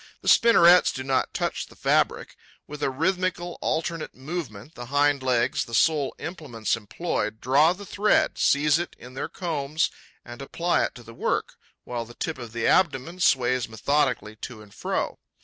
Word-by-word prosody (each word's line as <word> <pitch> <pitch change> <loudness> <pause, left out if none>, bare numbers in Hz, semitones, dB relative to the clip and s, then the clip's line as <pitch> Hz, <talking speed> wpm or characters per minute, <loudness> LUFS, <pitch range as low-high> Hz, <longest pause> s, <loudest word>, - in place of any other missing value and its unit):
The - - -8
spinnerets 180 -6 +6
do 130 - -5
not 135 -1 0
touch - - -2
the - - -17
fabric. - - 0 0.3
With 150 0 -9
a - - +1
rhythmical, 175 +4 -1
alternate 165 0 -2
movement, 135 - -6
the 120 0 -9
hind 145 +1 +2
legs, 125 -2 +1
the 115 - -5
sole 150 +1 +2
implements 150 - -3
employed, 110 0 -3
draw 140 +7 +4
the 200 +2 -10
thread, 210 +2 +1
seize 150 +2 +3
it 175 - -5
in 125 +1 -12
their 135 - -4
combs 155 -3 -1 0.3
and 120 +2 -9
apply 170 +5 0
it - - -6
to 120 - -11
the 115 - -12
work, - - -1 0.3
while 120 -1 -4
the 120 +1 -14
tip 160 -4 -4
of 120 -2 -8
the 115 0 -3
abdomen 170 0 +2
sways 125 - +2
methodically 125 -1 0
to 110 -1 -8
and 105 - -18
fro. - - -3
140 Hz, 170 wpm, -25 LUFS, 120-170 Hz, 0.3 s, spinnerets